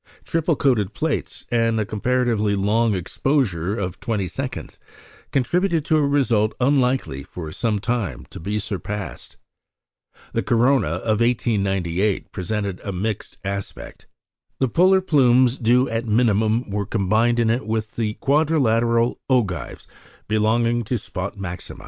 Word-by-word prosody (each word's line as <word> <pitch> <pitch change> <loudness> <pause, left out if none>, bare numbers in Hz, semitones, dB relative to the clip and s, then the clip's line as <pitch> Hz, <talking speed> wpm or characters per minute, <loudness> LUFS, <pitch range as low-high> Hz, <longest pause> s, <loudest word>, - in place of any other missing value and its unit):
Triple 165 0 +1
coated 110 -8 +1
plates, 160 -1 -3
and 115 -1 +2
a 110 - 0
comparatively 110 -1 0
long 105 +2 +2
exposure 100 - -1
of 90 -3 -4
twenty 105 -5 -2
seconds, - - -6 0.5
contributed 170 +4 +1
to 155 - +3
a - - +3
result 120 -7 +2
unlikely, 125 - +1
for 80 +2 -8
some 110 +2 -1
time, 105 - -2
to - - -8
be 100 +6 -2
surpassed. 105 -1 -5 1.0
The - - +1
corona 125 - +3
of 100 +7 -1
1898 100 -5 0
presented 100 0 -3
a 100 - -3
mixed 105 +3 -4
aspect. 100 0 -6 0.5
The 130 - +1
polar 185 - +4
plumes 130 -7 +4
due 125 +3 +3
at 115 0 -3
minimum 110 0 +2
were 100 -1 -2
combined 110 +4 +1
in 115 -1 +3
it 120 -1 -2
with 110 0 -2
the 110 -2 -1
quadrilateral 120 -6 +2
ogives 100 - -1 0.4
belonging 115 +2 +1
to 125 +4 -1
spot 95 -1 -5
maxima. 90 -3 -7
110 Hz, 130 wpm, -22 LUFS, 100-125 Hz, 1.0 s, polar